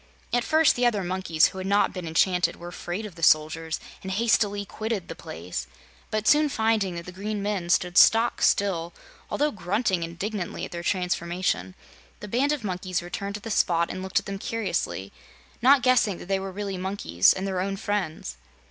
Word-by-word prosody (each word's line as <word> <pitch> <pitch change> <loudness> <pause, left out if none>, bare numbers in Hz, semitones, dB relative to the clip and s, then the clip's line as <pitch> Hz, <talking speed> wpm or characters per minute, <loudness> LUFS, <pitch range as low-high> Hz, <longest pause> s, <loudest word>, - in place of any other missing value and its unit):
At 245 0 +2
first, 315 +2 +4
the 245 0 +3
other 210 -5 0
monkeys 175 -3 +2
who 190 - -8
had 185 - -4
not 200 +1 +2
been 180 -3 -5
enchanted 180 +3 +2
were 175 - -9
afraid 175 +4 -5
of 205 - -8
the 165 - -13
soldiers, 160 +1 +2 0.2
and 190 - -6
hastily 205 -1 +1
quitted 215 -3 -4
the - - -5
place; 85 +3 -6 0.4
but 215 0 -2
soon 300 0 +5
finding 220 -7 +1
that 170 0 -6
the 180 - -8
great 205 +4 -4
men 200 -4 -2
stood 180 0 +3
stock 230 +2 +5
still, 175 -4 +1 0.3
although 295 +1 +1
grunting 195 0 0
indignantly 175 +3 -4
at - - -11
their 170 - -5
transformation, 175 - -1 0.4
the - - -8
band 255 +7 +1
of 295 -6 -2
monkeys 185 -2 -2
returned 200 +3 -5
to 210 - -6
the 225 - -6
spot 170 -4 +2
and 185 - -5
looked 190 0 -2
at - - -13
them 195 0 -5
curiously, 190 - -3 0.5
not 265 +1 +6
guessing 230 -7 +3
that - - -10
they 195 0 +1
were 195 0 -5
really 195 -1 -4
monkeys 185 - +2
and 190 - -2
their 190 -2 -1
own 195 +1 -2
friends. 170 - -3
190 Hz, 190 wpm, -26 LUFS, 175-215 Hz, 0.5 s, not